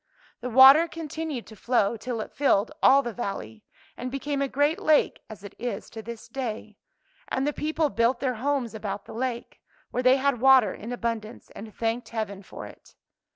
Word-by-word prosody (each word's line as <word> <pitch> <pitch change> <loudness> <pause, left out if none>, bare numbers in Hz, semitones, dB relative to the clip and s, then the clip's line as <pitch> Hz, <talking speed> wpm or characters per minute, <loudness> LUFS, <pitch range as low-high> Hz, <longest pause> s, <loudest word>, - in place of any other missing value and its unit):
The 250 - -5
water 265 +7 +8
continued 320 -5 -5
to 220 - -13
flow 235 0 +1
till 230 0 -4
it - - -7
filled 265 -5 +2
all 275 +1 +6
the 240 - -4
valley, 155 - -6 0.3
and 255 - -5
became 275 +1 -3
a 275 - +1
great 290 +4 +1
lake 305 -1 +2
as 210 -2 -11
it 200 - -9
is 225 -3 -5
to 225 - -7
this 230 0 -9
day; 220 -5 -6 0.5
and 265 - -1
the 295 - 0
people 310 0 -1
built 235 +2 +1
their 260 -2 0
homes 275 -4 -1
about 210 -2 -5
the - - -10
lake, 240 0 -4 0.3
where 250 - -1
they 255 +1 +5
had 270 -3 0
water 265 -3 +6
in 225 +4 -8
abundance 230 -2 -4
and 215 0 -10
thanked 230 +1 -2
heaven 210 -4 -4
for 190 - -10
it. - - -15
245 Hz, 190 wpm, -26 LUFS, 220-275 Hz, 0.5 s, water